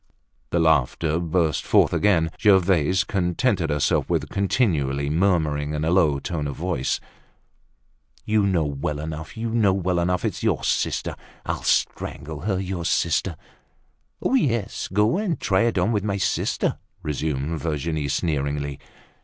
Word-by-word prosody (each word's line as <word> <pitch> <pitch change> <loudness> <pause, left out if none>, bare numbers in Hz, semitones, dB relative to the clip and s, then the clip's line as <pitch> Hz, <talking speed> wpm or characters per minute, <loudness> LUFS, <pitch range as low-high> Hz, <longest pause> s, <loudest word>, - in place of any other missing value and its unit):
The 85 - +1
laughter 80 0 +2
burst 85 -2 0
forth - - +3
again. 85 -6 +2
Gervaise 95 -4 +4
contented 90 0 0
herself 75 -2 +1
with - - 0
continually 75 - 0
murmuring 75 -4 +1
in 75 +1 -1
a 80 - +1
low 80 -6 +3
tone 75 +1 -3
of 70 - -5
voice: 85 -7 -1 1.3
"You 110 0 +2
know 85 -5 +1
well 75 +1 -3
enough, 80 +4 -6
you 115 0 -3
know 110 -4 +3
well 90 -2 0
enough. 90 +1 0
It's - - -2
your - - 0
sister. - - -1 0.3
I'll - - -2
strangle 75 +1 -1
her—your 95 -2 -2
sister." 85 +1 +1 0.9
"Yes, 125 - 0
go 105 - +2
and 195 -7 -1
try 95 -1 +2
it 115 -4 0
on 90 +5 +2
with 105 -3 0
my 100 -2 -1
sister," 95 - 0 0.2
resumed 75 +1 -2
Virginie 75 -1 -2
sneeringly. 70 -2 -1
85 Hz, 135 wpm, -23 LUFS, 75-95 Hz, 1.3 s, Gervaise